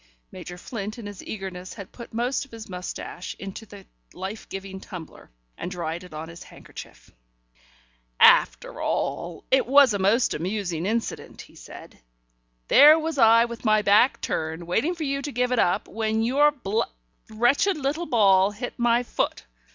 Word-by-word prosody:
Major 175 Hz, -, -9 dB
Flint 215 Hz, +2 st, -6 dB
in 230 Hz, -, -9 dB
his 205 Hz, -2 st, -8 dB
eagerness 185 Hz, -3 st, -7 dB
had 200 Hz, -, -10 dB
put 235 Hz, -, -11 dB
most 240 Hz, +5 st, -1 dB
of 275 Hz, -, -15 dB
his 225 Hz, -2 st, -10 dB
moustache 180 Hz, 0 st, -7 dB
into 195 Hz, +3 st, -8 dB
the 200 Hz, -1 st, -13 dB, 0.3 s
life 195 Hz, +4 st, -7 dB
giving 195 Hz, 0 st, -7 dB
tumbler, 180 Hz, -5 st, -11 dB, 0.3 s
and -, -, -4 dB
dried 170 Hz, -1 st, -4 dB
it 180 Hz, -, -13 dB
on 155 Hz, +1 st, -7 dB
his 170 Hz, 0 st, -11 dB
handkerchief. -, -, -13 dB, 1.1 s
"After -, -, +4 dB
all, 170 Hz, -1 st, -3 dB
it 265 Hz, -1 st, +3 dB
was 275 Hz, -3 st, +6 dB
a 200 Hz, -, -1 dB
most 210 Hz, +6 st, +2 dB
amusing 180 Hz, -1 st, -3 dB
incident," 225 Hz, +2 st, -3 dB
he -, -, -19 dB
said. -, -, -13 dB, 0.7 s
"There 300 Hz, +2 st, +8 dB
was 320 Hz, -2 st, -3 dB
I 230 Hz, 0 st, +6 dB
with 235 Hz, -1 st, -8 dB
my 215 Hz, -2 st, +3 dB
back 210 Hz, +6 st, +4 dB
turned, 160 Hz, +2 st, -3 dB
waiting 230 Hz, -, 0 dB
for 330 Hz, -, -5 dB
you 275 Hz, -1 st, -2 dB
to 290 Hz, +1 st, -5 dB
give 250 Hz, 0 st, 0 dB
it 250 Hz, -, +1 dB
up, 180 Hz, +4 st, +1 dB
when 220 Hz, +1 st, -1 dB
your 280 Hz, +5 st, +4 dB
bl 230 Hz, -7 st, -2 dB, 0.5 s
wretched 245 Hz, -, +2 dB
little 300 Hz, +4 st, -2 dB
ball 195 Hz, -6 st, +4 dB
hit 225 Hz, +4 st, -6 dB
my 240 Hz, 0 st, +3 dB
foot. -, -, -2 dB
215 Hz, 165 wpm, -25 LUFS, 190-250 Hz, 1.1 s, There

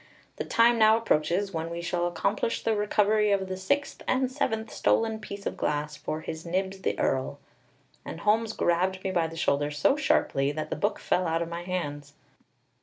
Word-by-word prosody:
The -, -, -3 dB
time 230 Hz, 0 st, +4 dB
now 220 Hz, 0 st, +6 dB
approaches 195 Hz, -1 st, 0 dB
when 165 Hz, 0 st, -3 dB
we 170 Hz, 0 st, -5 dB
shall 175 Hz, 0 st, -1 dB
accomplish 175 Hz, +5 st, -1 dB
the 225 Hz, -, +1 dB
recovery 210 Hz, 0 st, +2 dB
of 195 Hz, -1 st, +1 dB
the 185 Hz, -, -3 dB
sixth 235 Hz, +10 st, -1 dB
and 260 Hz, 0 st, +1 dB
seventh 220 Hz, -5 st, -2 dB
stolen 225 Hz, -1 st, +1 dB
piece 200 Hz, -1 st, -8 dB
of -, -, -2 dB
glass 150 Hz, 0 st, -2 dB
for 155 Hz, +1 st, -4 dB
His 160 Hz, 0 st, -6 dB
Nibs 190 Hz, +2 st, -2 dB
the -, -, -1 dB
Earl!" 130 Hz, -1 st, 0 dB, 0.7 s
And 165 Hz, -, -7 dB
Holmes 220 Hz, +3 st, +2 dB
grabbed 185 Hz, +2 st, 0 dB
me 190 Hz, -, -1 dB
by 170 Hz, -3 st, +1 dB
the 165 Hz, 0 st, -9 dB
shoulder 145 Hz, -2 st, +1 dB
so 150 Hz, -, +2 dB
sharply 140 Hz, -, +1 dB
that 155 Hz, +1 st, -5 dB
the -, -, 0 dB
book 205 Hz, 0 st, 0 dB
fell 180 Hz, -1 st, 0 dB
out 165 Hz, +1 st, 0 dB
of 165 Hz, -, -7 dB
my 170 Hz, 0 st, -5 dB
hands. 145 Hz, -6 st, -4 dB
185 Hz, 190 wpm, -27 LUFS, 165-215 Hz, 0.7 s, now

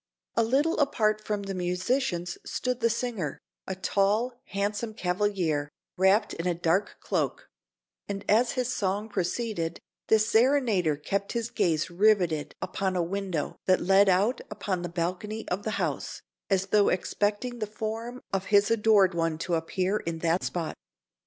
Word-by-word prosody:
A -, -, +4 dB
little 280 Hz, +9 st, +2 dB
apart 215 Hz, -7 st, +2 dB
from 210 Hz, -1 st, -2 dB
the 195 Hz, 0 st, -4 dB
musicians 180 Hz, 0 st, -1 dB
stood 250 Hz, -1 st, -2 dB
the 230 Hz, -1 st, +3 dB
singer, 225 Hz, -, -2 dB, 0.3 s
a 190 Hz, -, -3 dB
tall, 200 Hz, +6 st, +1 dB
handsome 205 Hz, +2 st, -2 dB
cavalier, 180 Hz, -6 st, 0 dB, 0.3 s
wrapped 190 Hz, +4 st, +3 dB
in 165 Hz, -, -3 dB
a 175 Hz, -, +1 dB
dark 175 Hz, +4 st, 0 dB
cloak; -, -, -2 dB, 0.6 s
and 200 Hz, 0 st, -4 dB
as 235 Hz, +3 st, +3 dB
his 255 Hz, -1 st, -1 dB
song 205 Hz, -1 st, -1 dB
proceeded, 190 Hz, -3 st, -2 dB, 0.3 s
the 220 Hz, -, +6 dB
serenader 220 Hz, -, +3 dB
kept 200 Hz, +7 st, -2 dB
his 235 Hz, -1 st, -2 dB
gaze 165 Hz, 0 st, +1 dB
rivetted 180 Hz, -5 st, +2 dB
upon 190 Hz, -1 st, -2 dB
a 175 Hz, -, +2 dB
window 185 Hz, -3 st, -3 dB
that 185 Hz, -1 st, +5 dB
led 195 Hz, +1 st, +5 dB
out 200 Hz, +7 st, +2 dB
upon 195 Hz, -3 st, -3 dB
the 175 Hz, -, -4 dB
balcony 185 Hz, +6 st, -3 dB
of 185 Hz, +3 st, -1 dB
the 215 Hz, -, -3 dB
house, -, -, -3 dB, 0.3 s
as 195 Hz, -1 st, +2 dB
though 205 Hz, 0 st, +4 dB
expecting 210 Hz, +6 st, -1 dB
the 215 Hz, -, -2 dB
form 225 Hz, +4 st, -5 dB
of 195 Hz, 0 st, 0 dB
his 205 Hz, +2 st, +4 dB
adored 210 Hz, -4 st, +4 dB
one 165 Hz, -2 st, 0 dB
to 170 Hz, +2 st, -3 dB
appear 185 Hz, +4 st, 0 dB
in 165 Hz, -4 st, -4 dB
that 165 Hz, +2 st, +1 dB
spot. 170 Hz, -3 st, -2 dB
200 Hz, 155 wpm, -28 LUFS, 180-220 Hz, 0.6 s, the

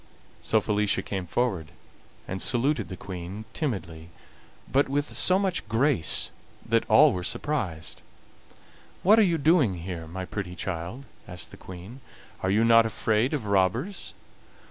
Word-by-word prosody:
So 110 Hz, -, +2 dB
Felicia 105 Hz, -1 st, 0 dB
came 95 Hz, -3 st, -4 dB
forward 95 Hz, -5 st, -1 dB, 0.6 s
and 95 Hz, +1 st, -4 dB
saluted 125 Hz, -2 st, +1 dB
the 95 Hz, -, -7 dB
Queen 95 Hz, +4 st, -7 dB
timidly, 85 Hz, -, -4 dB, 0.6 s
but 140 Hz, +1 st, +2 dB
with 145 Hz, +1 st, 0 dB
so 185 Hz, +4 st, +2 dB
much 190 Hz, -, -1 dB
grace 115 Hz, -, +2 dB, 0.3 s
that -, -, +1 dB
all -, -, +7 dB
were 90 Hz, -, -3 dB
surprised. 90 Hz, -, -3 dB, 1.0 s
"What 215 Hz, +5 st, +6 dB
are -, -, +7 dB
you 175 Hz, -5 st, +3 dB
doing 145 Hz, -, +3 dB
here, 85 Hz, -1 st, -6 dB
my 95 Hz, +3 st, -5 dB
pretty 90 Hz, -2 st, -5 dB
child?" 90 Hz, +9 st, -5 dB, 0.2 s
asked 90 Hz, -2 st, -8 dB
the -, -, -10 dB
Queen. 95 Hz, +9 st, -10 dB, 0.4 s
"Are 95 Hz, -, 0 dB
you 110 Hz, +4 st, +3 dB
not 115 Hz, 0 st, +6 dB
afraid 110 Hz, +2 st, 0 dB
of 130 Hz, -7 st, -4 dB
robbers?" 100 Hz, -, 0 dB
105 Hz, 145 wpm, -26 LUFS, 90-135 Hz, 1.0 s, all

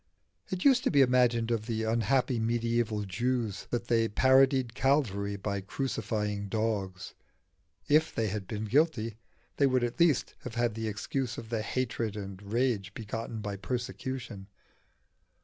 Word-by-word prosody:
It 185 Hz, -1 st, -3 dB
used 260 Hz, -3 st, +6 dB
to -, -, +4 dB
be 140 Hz, -2 st, +6 dB
imagined 120 Hz, -2 st, +3 dB
of 110 Hz, -1 st, -1 dB
the 110 Hz, -2 st, -1 dB
unhappy 115 Hz, +3 st, +1 dB
medieval 115 Hz, -1 st, 0 dB
Jews 110 Hz, +1 st, -2 dB
that 120 Hz, -1 st, -2 dB
they 115 Hz, -1 st, +2 dB
parodied 130 Hz, +1 st, +4 dB
Calvary 120 Hz, -8 st, +1 dB
by 100 Hz, 0 st, -3 dB
crucifying 105 Hz, -3 st, -2 dB
dogs; 100 Hz, -4 st, -2 dB, 0.7 s
if 155 Hz, +2 st, +4 dB
they 115 Hz, -, +1 dB
had 100 Hz, -1 st, -4 dB
been 110 Hz, -1 st, -3 dB
guilty 115 Hz, -4 st, +1 dB, 0.4 s
they 140 Hz, -, +4 dB
would 130 Hz, -2 st, +2 dB
at 120 Hz, +6 st, -2 dB
least 165 Hz, -6 st, +3 dB
have 125 Hz, -, -8 dB
had 120 Hz, -1 st, +1 dB
the 110 Hz, 0 st, -3 dB
excuse 120 Hz, +4 st, -3 dB
of 115 Hz, -1 st, -7 dB
the 115 Hz, -2 st, -1 dB
hatred 115 Hz, -2 st, -2 dB
and 100 Hz, -2 st, -7 dB
rage 105 Hz, -2 st, -1 dB
begotten 115 Hz, 0 st, -5 dB
by 105 Hz, -1 st, -4 dB
persecution. 125 Hz, -2 st, -5 dB
115 Hz, 150 wpm, -30 LUFS, 105-130 Hz, 0.7 s, used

